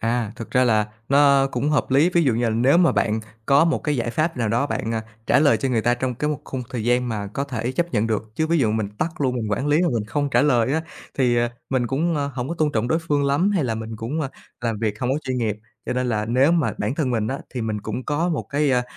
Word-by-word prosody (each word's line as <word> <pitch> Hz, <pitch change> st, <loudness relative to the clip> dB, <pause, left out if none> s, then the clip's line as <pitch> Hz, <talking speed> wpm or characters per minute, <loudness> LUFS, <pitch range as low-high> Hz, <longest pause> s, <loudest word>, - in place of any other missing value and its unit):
À, 115 Hz, -2 st, -1 dB
thực 115 Hz, -, -8 dB
ra 130 Hz, -1 st, +3 dB
là 110 Hz, -3 st, +2 dB, 0.2 s
nó 140 Hz, -1 st, +5 dB
cũng 135 Hz, +3 st, -1 dB
hợp 150 Hz, -, 0 dB
lý, 145 Hz, +7 st, +4 dB
ví 170 Hz, -1 st, +3 dB
dụ 125 Hz, -5 st, +2 dB
như 120 Hz, +1 st, 0 dB
là 115 Hz, -, +2 dB
nếu 125 Hz, +8 st, +3 dB
mà 175 Hz, -2 st, +4 dB
bạn 110 Hz, 0 st, +1 dB, 0.3 s
có 140 Hz, +3 st, +5 dB
một 165 Hz, -, +1 dB
cái 150 Hz, -2 st, 0 dB
giải 120 Hz, 0 st, -1 dB
pháp 155 Hz, +2 st, -1 dB
nào 115 Hz, -3 st, 0 dB
đó 120 Hz, +6 st, +1 dB
bạn, 115 Hz, -5 st, -3 dB
à, 110 Hz, -, -2 dB, 0.2 s
trả -, -, +4 dB
lời 145 Hz, 0 st, +4 dB
cho 135 Hz, -, -2 dB
người 120 Hz, -3 st, +1 dB
ta 120 Hz, +2 st, +2 dB
trong 125 Hz, 0 st, -2 dB
cái 150 Hz, +5 st, -1 dB
một 150 Hz, -1 st, -3 dB
khung 130 Hz, -2 st, -5 dB
thời 115 Hz, -3 st, -3 dB
gian 125 Hz, +1 st, +2 dB
mà 105 Hz, -3 st, -3 dB
có 135 Hz, +8 st, -3 dB
thể 125 Hz, -2 st, -3 dB
chấp 175 Hz, +4 st, -1 dB
nhận 110 Hz, -2 st, +1 dB
được, 110 Hz, -1 st, -3 dB
chứ 160 Hz, -, 0 dB
ví 165 Hz, 0 st, +2 dB
dụ 115 Hz, -6 st, +2 dB
mình 110 Hz, -2 st, -1 dB
tắt 165 Hz, 0 st, -3 dB
luôn, 130 Hz, -2 st, +1 dB
mình 110 Hz, -3 st, -3 dB
quản 105 Hz, +7 st, -1 dB
lý 150 Hz, +4 st, +3 dB
mà 175 Hz, -, +2 dB
mình 110 Hz, -, -1 dB
không 145 Hz, +6 st, -1 dB
trả 120 Hz, 0 st, +4 dB
lời 130 Hz, -3 st, +2 dB
á 160 Hz, +1 st, 0 dB, 0.4 s
thì, 125 Hz, -2 st, +3 dB
à, 120 Hz, 0 st, +1 dB, 0.2 s
mình 125 Hz, -2 st, +1 dB
cũng, 160 Hz, +7 st, 0 dB
ơ, 145 Hz, -1 st, 0 dB
hổng 125 Hz, +1 st, -3 dB
có 170 Hz, -, -2 dB
tôn 150 Hz, -2 st, +1 dB
trọng 115 Hz, +2 st, 0 dB
đối 160 Hz, -, +2 dB
phương 145 Hz, -4 st, 0 dB
lắm 145 Hz, +8 st, +2 dB
hay 185 Hz, -8 st, +1 dB
là 115 Hz, -3 st, -1 dB
mình 110 Hz, 0 st, -6 dB
cũng, 125 Hz, +9 st, -3 dB
ơ, 140 Hz, -, -2 dB, 0.3 s
làm 115 Hz, -3 st, -2 dB
việc 110 Hz, -1 st, -2 dB
hông 125 Hz, 0 st, 0 dB
có 140 Hz, -, +1 dB
chuyên 130 Hz, -1 st, -2 dB
nghiệp. 110 Hz, -3 st, -1 dB, 0.3 s
Cho -, -, -1 dB
nên 125 Hz, 0 st, -1 dB
là 105 Hz, -2 st, 0 dB
nếu 130 Hz, +7 st, +3 dB
mà 165 Hz, -4 st, +1 dB
bản 135 Hz, -, -1 dB
thân 145 Hz, -5 st, -1 dB
mình 110 Hz, -3 st, 0 dB
á, 135 Hz, -, -2 dB, 0.2 s
thì 125 Hz, -, -2 dB
mình 110 Hz, -1 st, -2 dB
cũng 110 Hz, +5 st, -5 dB
có 155 Hz, +4 st, 0 dB
một 165 Hz, -, -1 dB
cái, 145 Hz, 0 st, +1 dB
a, 125 Hz, -1 st, +2 dB
125 Hz, 300 wpm, -22 LUFS, 115-145 Hz, 0.4 s, nó